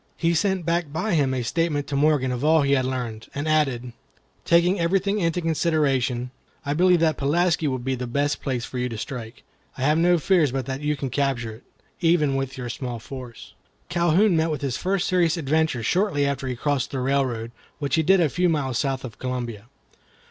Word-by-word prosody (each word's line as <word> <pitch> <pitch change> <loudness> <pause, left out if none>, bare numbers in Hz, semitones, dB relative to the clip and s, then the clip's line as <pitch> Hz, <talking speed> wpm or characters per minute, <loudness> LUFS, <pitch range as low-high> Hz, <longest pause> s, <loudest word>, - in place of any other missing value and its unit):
He 170 0 +1
sent 190 0 0
back 170 -2 0
by 175 +7 -1
him 140 -5 +2
a 130 -2 -1
statement 150 +2 0
to 140 - -4
Morgan 140 -3 +2
of 125 +1 -3
all 155 0 +4
he 140 - +1
had 130 -2 +3
learned, 120 -4 -4
and 145 +2 -3
added: 135 -6 0 0.5
"Taking 175 +3 +3
everything 195 +4 +1
into 170 -1 0
consideration, 140 -7 0 0.3
I 145 - 0
believe 180 +2 +4
that 160 -2 +2
Pulaski 165 +3 +1
will 130 -2 0
be 130 +2 -2
the 125 -1 -4
best 145 +4 -1
place 125 -4 -2
for 125 - -6
you 125 0 -1
to 115 - -6
strike. 115 0 -7 0.3
I 130 - -3
have 150 +3 +3
no 175 +1 +4
fears 165 -3 +2
but 135 -1 -2
that 135 +2 -4
you 150 0 0
can 135 -2 -4
capture 130 -4 -1
it, - - -23 0.4
even 165 -5 +2
with 135 -1 -3
your 125 -1 -5
small 125 -4 -4
force." 125 0 -10 0.4
Calhoun 175 +3 +3
met 160 0 +2
with 150 -3 -3
his 135 -4 -2
first 190 +3 -1
serious 175 -2 +2
adventure 155 -4 0
shortly 180 - +1
after 140 -1 -2
he 125 - -2
had 120 - -19
crossed 145 -3 0
the 135 - -4
railroad, 125 -4 -1 0.3
which 140 -2 -4
he 160 - +4
did 190 +4 +4
a 165 - +4
few 180 +5 +1
miles 135 -6 0
south 135 -2 -1
of 110 -5 -10
Columbia. 120 -4 -4
145 Hz, 210 wpm, -24 LUFS, 130-165 Hz, 0.5 s, all